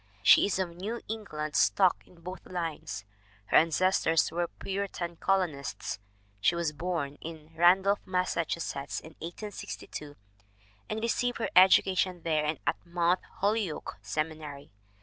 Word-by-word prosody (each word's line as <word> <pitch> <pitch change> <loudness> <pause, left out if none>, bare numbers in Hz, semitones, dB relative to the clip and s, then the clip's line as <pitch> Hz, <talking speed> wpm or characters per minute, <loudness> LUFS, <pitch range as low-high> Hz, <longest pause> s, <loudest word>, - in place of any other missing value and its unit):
She - - +7
is 200 - 0
of 180 -3 -2
New 210 +7 -4
England 155 -9 -4
stock 185 -3 +3
in 170 -2 -19
both 180 +2 -8
lines. 160 - -4 0.4
Her - - +4
ancestors 165 0 +3
were 175 +1 0
Puritan 190 -3 -4
colonists. 165 - -1 0.4
She 170 - +3
was 170 -3 0
born 150 -3 -3
in 160 -1 -9
Randolph, 190 +4 +5
Massachusetts, 170 -6 -2
in 160 - -12
1862, 170 -5 -7 0.7
and 220 +1 -3
received 245 +1 0
her 230 - -2
education 185 -1 +5
there 155 -2 +1
and 155 0 0
at 145 +3 -1
Mount 175 +1 +1 0.2
Holyoke 205 -4 0
Seminary. 155 -4 -4
170 Hz, 130 wpm, -30 LUFS, 155-190 Hz, 0.7 s, She